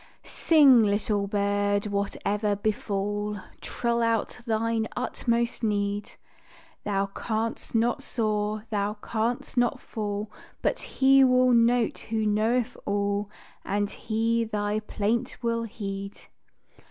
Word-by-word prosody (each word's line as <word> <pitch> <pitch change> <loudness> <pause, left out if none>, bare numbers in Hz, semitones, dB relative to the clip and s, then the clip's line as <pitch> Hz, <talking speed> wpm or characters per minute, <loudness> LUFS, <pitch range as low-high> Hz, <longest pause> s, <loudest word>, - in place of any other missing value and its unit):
Sing, 285 -7 +5
little 205 -1 +1
bird, 205 0 +1
whate'er 205 +1 -1
befall 205 0 -2 0.2
Trill 235 -1 -1
out 230 0 0
thine 225 0 0
utmost 235 -1 -1
need; 205 -2 -1 0.7
Thou 195 -1 0
canst 220 +4 -3
not 230 +1 +2
soar, 215 -2 -1
thou 205 0 0
canst 235 +3 -2
not 245 -1 +2
fall 210 -1 -4 0.3
But - - +1
He 270 0 +4
will 255 -1 +5
note 235 -1 +3
who 220 -1 -2
knoweth 225 +4 +1
all, 200 0 -1 0.3
And 205 0 -1
He 230 +1 0
thy 210 -1 -1
plaint 215 +2 -2
will 230 0 0
heed. 200 -3 -6
215 Hz, 110 wpm, -27 LUFS, 205-230 Hz, 0.7 s, Sing